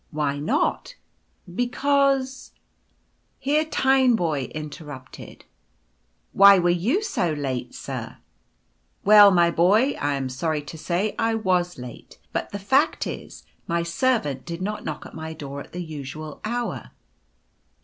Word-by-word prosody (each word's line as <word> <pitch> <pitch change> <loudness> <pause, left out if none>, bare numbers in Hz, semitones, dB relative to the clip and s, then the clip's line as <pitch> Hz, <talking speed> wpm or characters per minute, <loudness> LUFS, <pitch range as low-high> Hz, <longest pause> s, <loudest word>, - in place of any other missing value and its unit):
" - - -41
Why 145 -1 0
not? 160 - -1 0.3
" 180 - -20
•' - - -13
Because'' 270 +2 +1 0.4
— - - -44
Here 300 +2 +3
Tineboy 245 - +2
interrupted, 150 -3 -9 0.4
" - - -45
Why 200 0 +10
were 175 -1 +3 0.2
you 375 - +2
so 175 - -1
late, 135 -4 -4
strr - - -6 0.4
" - - -41
Well, 205 0 +9
my 175 -3 +4
boy, 205 +11 +4
I 145 0 +1
am 135 -1 -2
sorry 150 +4 -2
to 150 +3 -9
say 185 +6 -1
I 225 0 +1
was 180 -4 0
late; 125 -2 -10 0.2
but - - -2
the 200 - -4
fact 265 +9 +2
is, - - -8 0.2
my 170 0 0
servant 170 - 0
did 170 +1 -6
not 210 +2 -3
knock 155 -1 -5
at - - -11
my 160 0 -6
door 140 -2 -7
at - - -13
the 180 0 -5
usual 150 -1 -8
hour." 240 +2 -3
175 Hz, 150 wpm, -24 LUFS, 150-230 Hz, 0.4 s, Why